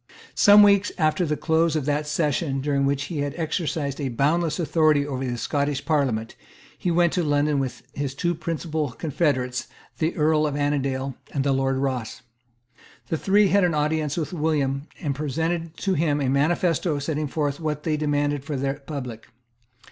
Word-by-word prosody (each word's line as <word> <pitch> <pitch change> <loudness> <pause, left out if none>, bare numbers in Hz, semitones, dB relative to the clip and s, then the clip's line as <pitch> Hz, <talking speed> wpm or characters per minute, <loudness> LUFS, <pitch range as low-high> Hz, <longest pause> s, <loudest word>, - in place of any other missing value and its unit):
Some 205 0 +7
weeks 200 0 +4
after 160 +1 +1
the 150 0 -1
close 160 +1 +2
of 150 -4 -1
that 150 +1 0
session 150 -2 0
during 140 0 0
which 140 0 0
he 150 +2 -4
had 145 -1 -2
exercised 155 -3 -2
a 135 - -1
boundless 155 +8 +1
authority 155 -3 +3
over 135 -2 -3
the 120 -2 -2
Scottish 140 +3 -1
Parliament, 130 -8 0 0.4
he 180 - -2
went 170 0 +3
to 180 - +1
London 145 -1 +1
with 130 -2 -4
his 140 -2 -3
two 175 +4 0
principal 155 -4 -3
confederates, 130 -5 -1 0.3
the 160 +1 0
Earl 155 0 +2
of 145 - -3
Annandale 140 -2 -1 0.2
and 135 - +1
the 140 - +1
Lord 135 0 +1
Ross. 130 -2 -3 0.9
The 160 - 0
three 200 +4 +3
had 200 0 +4
an 175 -3 +2
audience 150 0 0
of 165 +1 -3
William, 150 -3 0
and 145 -5 -1
presented 160 +4 -2
to 195 - 0
him 150 -3 +1
a 135 -3 0
manifesto 160 +3 +1
setting 150 +1 -2
forth 145 -1 -2
what 150 -2 -3
they 155 -2 0
demanded 145 -1 0
for 150 0 -4
the 135 +1 -2
public. 125 -6 -6
150 Hz, 175 wpm, -24 LUFS, 140-160 Hz, 0.9 s, Some